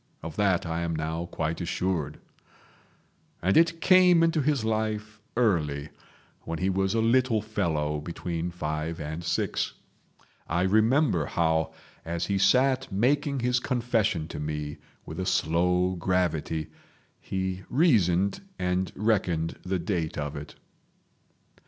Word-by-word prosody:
Of 80 -1 -6
that 95 -4 +2
I 85 0 -2
am 85 -1 -1
now 80 +2 -3
quite 80 +1 -3
assured. 85 -4 -2 1.2
And 95 +2 +1
it 165 0 +4
came 180 -2 +6
into 165 -2 +2
his 140 -5 +1
life 110 -1 -2 0.2
early, 75 -11 +1 0.5
when 85 - -4
he 95 +3 0
was 95 +2 0
a 115 - +2
little 120 0 +3
fellow 80 -8 -1
between 85 +1 -4
five 80 -1 -3
and 80 +2 -5
six. 85 - -1 0.7
I 85 +2 +1
remember 110 - +3
how, 80 -1 +1 0.3
as 85 +1 -2
he 100 -1 0
sat 130 +6 +3
making 135 +6 +1
his 125 0 +2
confession 115 -10 0
to - - -6
me 75 0 -4 0.3
with 80 - -7
a 95 - -1
slow 90 +2 +2
gravity, 80 -3 -1 0.5
he 95 -1 -3
reasoned 100 - +3 0.2
and 90 0 -1
reckoned 90 -7 0
the 95 +1 -1
date 85 -2 -2
of 75 0 -3
it. 75 0 -8
90 Hz, 130 wpm, -27 LUFS, 80-110 Hz, 1.2 s, came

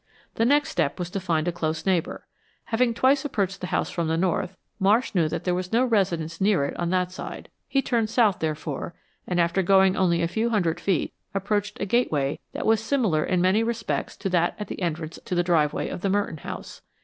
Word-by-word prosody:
The 225 - +1
next 290 +4 +3
step 140 - 0
was 180 -1 -4
to 195 - -2
find 170 -3 0
a - - +2
close 160 -1 -3
neighbor. 185 -4 0 0.4
Having 235 0 +1
twice 270 +3 +3
approached 195 -9 -2
the 180 - -3
house - - -1
from 170 -2 -1
the 160 0 0
north, 185 +1 -1 0.2
Marsh 210 +6 +3
knew 165 -5 +2
that 165 - -3
there 180 - +1
was 180 0 -3
no 240 +3 +3
residence 175 -8 0
near 195 -8 +3
it - - -4
on 175 -1 0
that 180 0 +1
side. 185 - -8 0.2
He 275 -1 +1
turned 230 -3 0
south, 220 -5 +3
therefore, 155 0 -3 0.3
and 180 -1 0
after 170 +3 +2
going 190 0 +4
only 170 -2 +2
a - - +2
few 220 +7 0
hundred 175 -8 +1
feet, 190 -5 0 0.2
approached 205 +1 -1
a - - -1
gateway 155 - +1
that - - -4
was 220 0 +4
similar 225 - +1
in 180 -1 +1
many 190 +4 +3
respects 230 0 -2
to 195 - -3
that 175 -1 +1
at 210 - -6
the - - -6
entrance 165 -2 -3
to 180 - -3
the 175 - +2
driveway 160 -4 +1
of - - -6
the 195 - 0
Merton 200 -4 0
home. - - -6
185 Hz, 220 wpm, -25 LUFS, 170-215 Hz, 0.4 s, going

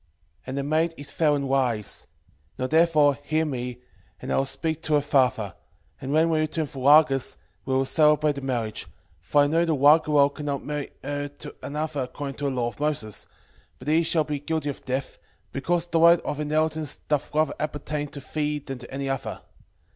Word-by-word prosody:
6:12 - - -37
And 130 +1 -4
the 140 - -1
maid 160 +3 +1
is 145 0 -7
fair 150 -3 +2
and 140 -1 -2
wise: 125 -6 0 0.5
now 130 - -1
therefore 150 -2 +4
hear 155 +2 0
me, 125 -3 -4 0.4
and - - -3
I - - +2
will 135 - +2
speak 160 +3 -3
to 155 -2 +1
her 145 - +4
father; 125 -9 +1 0.5
and 135 - -4
when 160 +2 +3
we 160 - +2
return 155 +1 0
from 135 -2 -7
Rages 145 -3 +5 0.3
we 130 - 0
will 135 0 +2
celebrate 150 +1 +3
the 140 - -6
marriage: 120 -5 -2 0.3
for 145 - +3
I - - +3
know 165 +4 +2
that 165 - 0
Raguel 145 0 +5
cannot 145 -2 -4
marry 150 -1 -3
her 145 0 -3
to 145 0 -11
another 150 0 -3
according 135 +2 -5
to 145 - -3
the - - +2
law 125 -3 -1
of - - -15
Moses, 145 -8 -2 0.5
but - - -12
he 160 +2 +4
shall 160 -1 +2
be 150 -1 -3
guilty 155 0 -2
of 140 - -6
death, 130 +1 -3 0.3
because 170 +5 0
the 170 -1 0
right 170 +1 +7
of 150 - -4
inheritance 155 0 0
doth 150 -1 0
rather 155 +1 +2
appertain 150 0 -3
to 140 0 -8
thee 150 +2 -2
than 135 -3 -7
to 120 - -11
any 135 +1 -3
other. 135 -2 -3
145 Hz, 200 wpm, -25 LUFS, 135-155 Hz, 0.5 s, right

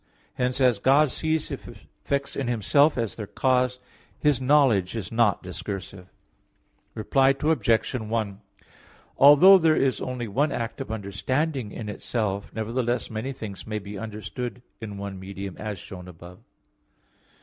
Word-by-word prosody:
Hence 125 +1 -1
as 125 -5 +3
God 140 +4 +4
sees 160 -1 -1
His - - -7
effects 140 0 -5
in 135 - -2
Himself 130 +6 +3
as 115 -3 -1
their 105 -3 -6
cause, 125 +4 +1 0.4
His 145 -3 +2
knowledge 130 -9 +3
is 105 -6 -5
not 115 -4 +2
discursive. 90 +1 -7 0.9
Reply 135 +5 +3
Obj. 150 -8 +1
1: 110 -4 -3 0.8
Although 170 +8 +9
there 160 -2 +4
is 135 -1 +1
only 125 -2 -4
one 140 +9 +1
act 115 0 -4
of 130 - -6
understanding 115 - -2
in 110 0 -7
itself, 105 -1 -3
nevertheless 120 +2 -2
many 110 +5 -3
things 110 -7 -8
may 110 -1 -2
be 105 0 -7
understood 110 +2 -6 0.2
in 105 -3 -7
one 100 -1 -6
(medium), 95 0 -7
as 105 -2 -5
shown 90 0 -10
above. 90 +1 -12
115 Hz, 140 wpm, -25 LUFS, 100-135 Hz, 0.9 s, Although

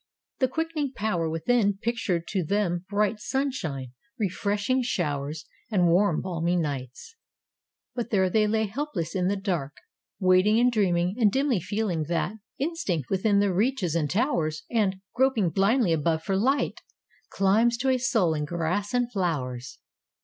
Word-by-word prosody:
The 260 - +3
quickening 305 -1 -2
power 180 -8 -1
within 200 +5 +1
pictured 210 -6 -1
to 190 -3 0
them 180 0 -1
bright 210 +1 +1
sunshine, 210 - -3 0.3
refreshing 205 +4 0
showers 150 - -2 0.2
and 180 -6 +3
warm, 180 -1 +3
balmy 175 -1 -1
nights. 145 - -4 0.8
But 240 -2 -3
there 190 -3 +3
they 210 +3 +2
lay 220 +1 +1
helpless 210 - -4
in 180 -1 0
the 200 - +1
dark, 175 -8 -2 0.5
waiting 185 +3 +4
and 245 +1 +4
dreaming 185 -3 +1
and 215 -4 +4
dimly 270 -4 +1
feeling 185 -4 -2
that— 175 +6 -2 0.2
Instinct 270 - -2
within 200 +2 +2
that 200 -2 +1
reaches 205 - 0
and 155 -3 0
towers 165 - 0
And, 210 -5 +2 0.2
groping 245 -9 +2
blindly 195 - +3
above 160 +1 0
for 195 - -1
light, 260 +9 +1 0.5
Climbs 220 +5 +2
to 265 +2 0
a 260 -1 +2
soul 220 -9 +2
in 150 -1 -2
grass 175 +7 -2
and 245 -1 +1
flowers. 130 - -3
195 Hz, 150 wpm, -26 LUFS, 170-230 Hz, 0.8 s, waiting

